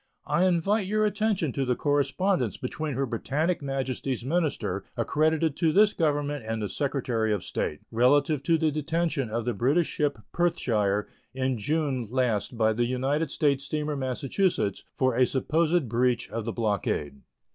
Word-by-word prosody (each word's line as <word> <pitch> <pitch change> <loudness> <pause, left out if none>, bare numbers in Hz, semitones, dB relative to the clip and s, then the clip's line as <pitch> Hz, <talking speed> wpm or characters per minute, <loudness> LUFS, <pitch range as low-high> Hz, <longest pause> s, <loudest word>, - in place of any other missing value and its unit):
I 180 - +2
invite 185 +3 +2
your 215 +1 +2
attention 210 -7 0
to 135 - -1
the 125 -1 +1
correspondence 145 - +1
between 145 +2 -4
Her 135 +2 0
Britannic 145 +9 -1
Majesty's 135 -2 -3
minister 160 +1 -1
accredited 155 0 +1
to 165 -2 +2
this 205 +4 +5
Government 145 -4 0
and 110 0 -3
the 105 -2 -3
Secretary 125 -6 -1
of 105 -4 -1
State 75 - -3
relative 140 +5 +3
to 165 +3 +2
the 160 -1 +1
detention 155 -3 -1
of 115 +1 -2
the 120 - 0
British 140 - +2
ship 145 -3 -1 0.2
Perthshire 105 - +1 0.3
in 130 -2 -1
June 140 -1 -1
last 120 -2 0
by 110 -1 +3
the 120 +2 +1
United 135 +5 0
States 140 -2 +1
steamer 150 +1 -2
Massachusetts 135 - -1
for 130 -2 +1
a 130 - +4
supposed 160 +3 +1
breach 120 +1 0
of 115 -1 -3
the 115 - -2
blockade. 95 - -1
140 Hz, 155 wpm, -27 LUFS, 120-160 Hz, 0.3 s, this